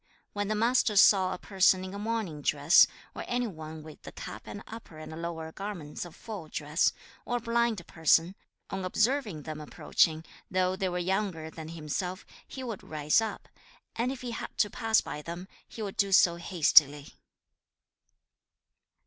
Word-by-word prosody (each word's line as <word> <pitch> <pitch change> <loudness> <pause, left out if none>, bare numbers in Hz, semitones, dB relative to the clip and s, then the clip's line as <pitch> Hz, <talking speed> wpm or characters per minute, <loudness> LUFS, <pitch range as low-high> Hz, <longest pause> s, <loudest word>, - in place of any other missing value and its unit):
When 205 -1 -2
the 215 - 0
Master 230 0 +2
saw 190 -2 +6
a - - -3
person 185 -1 +3
in 190 - -7
a 200 - -5
mourning 210 -8 -3
dress, 145 +3 +6 0.3
or - - -6
any 245 0 0
one 160 -6 -8
with 155 -1 -12
the - - -10
cap - - -9
and 205 - -7
upper 225 -8 -10
and 160 +1 -8
lower 160 -1 -5
garments 180 -6 -6
of 175 - -12
full 205 -8 -8
dress, 150 +2 +1 0.3
or 245 - -1
a - - -3
blind 230 -4 0
person, 165 +2 +3 0.4
on 190 -1 -3
observing 215 - 0
them 155 0 -6
approaching, 160 +2 +1 0.2
though 185 0 +1
they 190 0 -1
were 180 - -3
younger 180 -3 -1
than 160 -1 -8
himself, 170 +4 -4 0.2
he 260 - -7
would 230 -6 -5
rise 150 +5 +1
up, 220 -2 -5 0.5
and 240 +3 0
if 265 - -7
he 245 -1 -4
had 230 - -6
to 210 - +2
pass 225 -2 +2
by 150 - -6
them, 170 +4 -7 0.2
he 225 - -7
would 200 -2 -6
do 200 -1 +2
so 175 -2 +5
hastily. 150 -5 +4
185 Hz, 175 wpm, -29 LUFS, 160-215 Hz, 0.5 s, saw